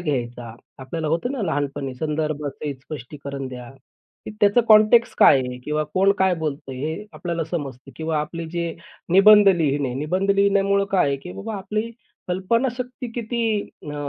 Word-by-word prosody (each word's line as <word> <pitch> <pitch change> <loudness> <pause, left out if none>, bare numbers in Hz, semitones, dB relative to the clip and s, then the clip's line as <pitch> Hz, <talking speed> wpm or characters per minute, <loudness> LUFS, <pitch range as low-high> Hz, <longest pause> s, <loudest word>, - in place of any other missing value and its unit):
घ्यायचा. 120 -7 -3 0.2
आपल्याला 155 +4 -4
होतं 170 - -1
ना 260 -6 -3
लहानपणी 140 -4 -2
संदर्भसहित 150 0 -3
स्पष्टीकरण 140 0 -7
द्या. 125 -1 -9 0.7
त्याचं 205 +3 +5
कॉन्टेक्स्ट 215 +2 +6
काय 140 - +7
आहे? 125 -1 -5
किंवा 150 0 0
कोण 195 +1 +4
काय 190 -1 +3
बोलतंय 140 -4 -4
हे 160 +9 -4
आपल्याला 170 -2 -3
समजतं. 140 -5 -6
किंवा 160 -1 -1
आपले 165 +2 -5
जे 170 -1 -2 0.4
निबंध 205 +1 +8
लिहिणे, 145 -7 +1
निबंध 180 +8 -1
लिहिण्यामुळं 200 0 +3
काय 185 -6 +3
आहे, 140 - 0
की 180 +6 -10
बाबा 220 +2 -6
आपली 215 +4 -3 0.4
कल्पनाशक्ती 240 +7 -1
किती 235 0 -3 0.4
अ, 150 - -7
165 Hz, 145 wpm, -22 LUFS, 140-200 Hz, 0.7 s, निबंध